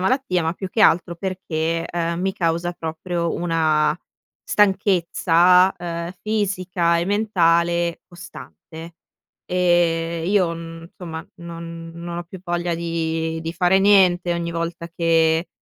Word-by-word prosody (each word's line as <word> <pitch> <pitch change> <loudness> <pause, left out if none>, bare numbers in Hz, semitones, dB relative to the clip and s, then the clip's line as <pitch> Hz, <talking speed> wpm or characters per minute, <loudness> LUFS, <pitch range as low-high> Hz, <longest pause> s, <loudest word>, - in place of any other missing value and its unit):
malattia, 190 -3 0
ma 160 - 0
più 190 +1 -6
che 220 - -2
altro 175 +1 +3
perché, 165 -3 -2
ehm, 170 0 -2
mi 190 +1 0
causa 170 -2 -1
proprio 170 +1 -3
una 160 -2 +1 0.5
stanchezza, 185 -2 +3
ehm, 170 0 -5
fisica 185 -5 0
e 170 - 0
mentale 170 -4 +1
costante 170 -2 -11 0.5
e 170 -2 +1
io 185 -3 +2
n 165 0 -9
somma, 165 -1 -7
non 165 -1 -8
non 170 0 -6
ho - - -4
più 180 +2 -11
voglia 175 -1 -1
di 165 -1 -2
di 165 - -4
fare 180 +2 +3
niente, 185 -3 +4
ogni 170 0 -3
volta 170 0 -4
che, 165 0 +1
170 Hz, 125 wpm, -21 LUFS, 165-180 Hz, 0.5 s, niente